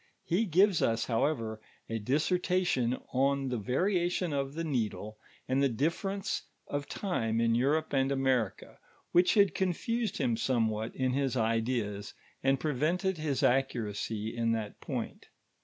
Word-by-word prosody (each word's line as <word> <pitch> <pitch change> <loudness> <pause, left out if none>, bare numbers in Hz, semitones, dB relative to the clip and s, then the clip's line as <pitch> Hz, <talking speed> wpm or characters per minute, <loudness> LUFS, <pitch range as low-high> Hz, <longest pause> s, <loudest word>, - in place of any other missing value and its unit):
He 190 +7 +1
gives 190 0 +4
us, 115 0 +1
however, 115 -3 -1 0.3
a 115 0 -2
dissci 150 - +1
lation 175 -10 +1
on 135 +1 +2
the 125 - -1
variation 175 - 0
of 140 0 -2
the 165 - -2
needle, 110 -7 -2 0.3
and 130 +2 +1
the 140 - +4
diflfcrenee 170 - -1 0.2
of 145 0 -4
time 115 - -1
in 115 0 +3
Europe 145 +7 +1
and 135 0 +2
America, 130 -6 0 0.3
which 175 +1 +4
had 200 -2 +5
confused 215 +4 -1
him 120 -5 +1
somewhat 115 -2 0
in 130 -1 0
his 135 -2 0
ideas, 110 -3 -1 0.3
and 135 0 +2
prevented 160 +6 0
his 150 -3 -1
nceuracy 110 -4 0
in 115 -1 +1
that 110 -2 -4
point. - - -5
135 Hz, 140 wpm, -31 LUFS, 115-165 Hz, 0.3 s, had